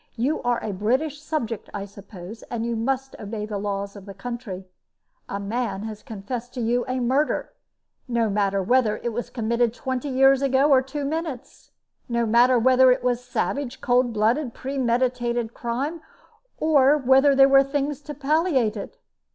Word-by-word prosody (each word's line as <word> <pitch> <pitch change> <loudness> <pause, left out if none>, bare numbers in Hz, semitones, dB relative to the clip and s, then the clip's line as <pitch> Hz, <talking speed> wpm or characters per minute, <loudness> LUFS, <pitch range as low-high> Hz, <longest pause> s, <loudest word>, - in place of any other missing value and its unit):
"You 260 +7 0
are 245 -1 0
a 210 - -3
British 260 +10 -1
subject, 240 -9 -3
I 200 -1 -4
suppose, 200 +1 -11
and 230 -1 -3
you 235 0 -1
must 265 +3 -2
obey 210 0 -5
the 210 -2 -4
laws 200 0 -3
of 200 -1 -11
the 195 - -9
country. 215 -3 -6 0.6
A 200 - -3
man 205 -1 -3
has 215 -1 -7
confessed 240 +2 -7
to - - -4
you 240 +1 +1
a 255 0 -1
murder 265 +5 0 0.5
no 235 -2 +1
matter 200 -1 0
whether 235 0 +2
it 235 - -4
was 240 +2 -4
committed 235 0 0
twenty 260 +2 -3
years 270 +1 +4
ago 275 +2 +3
or 265 -2 +6
two 275 +2 -5
minutes; 290 -3 -5 0.4
no 235 0 +1
matter 240 +3 +5
whether 255 +2 +5
it 250 0 +1
was 245 -1 +1
a - - -21
savage, 270 +1 -2
cold 245 0 +2
blooded, 230 +4 0
premeditated 245 -3 -1
crime, 275 +8 -3 0.6
or 295 -2 +4
whether 270 +1 +4
there 270 0 +7
were 275 0 +6
things 285 +1 -2
to 295 0 -8
palliate 285 - +1
it. 200 - -7
245 Hz, 170 wpm, -24 LUFS, 220-270 Hz, 0.6 s, there